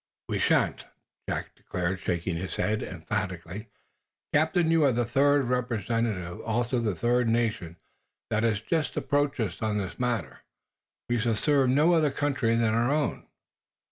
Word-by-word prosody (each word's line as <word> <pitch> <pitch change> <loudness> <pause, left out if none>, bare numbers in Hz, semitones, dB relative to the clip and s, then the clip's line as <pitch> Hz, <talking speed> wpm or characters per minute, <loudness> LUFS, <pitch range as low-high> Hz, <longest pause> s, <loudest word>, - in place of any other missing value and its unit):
"We - - -1
shan't," - - +2 0.4
Jack - - -3
declared, 90 +1 -3
shaking 85 0 -2
his 90 +3 -4
head, 110 +1 0
emphatically. 95 +2 -4 0.7
"Captain, 160 +2 +3
you 165 -1 +4
are 140 - +5
the 120 0 0
third, 140 +3 +3
representing 115 -5 -1 0.2
also 120 +2 0
the 110 -5 -1
third 120 +3 +2
nation, 110 -8 -1 0.5
that 110 - +2
has 110 -2 +1
just 155 +6 -1
approached 145 0 0
us 105 -6 -2
on 110 -1 0
this 95 -3 -4
matter. 110 - -2 0.7
We 120 -1 +1
shall 115 0 +1
serve 140 +1 +2
no 150 +7 +4
other 155 -3 +3
country 135 -5 0
than 115 -1 +2
our 115 +2 +2
own." 150 0 -1
115 Hz, 150 wpm, -27 LUFS, 105-135 Hz, 0.7 s, are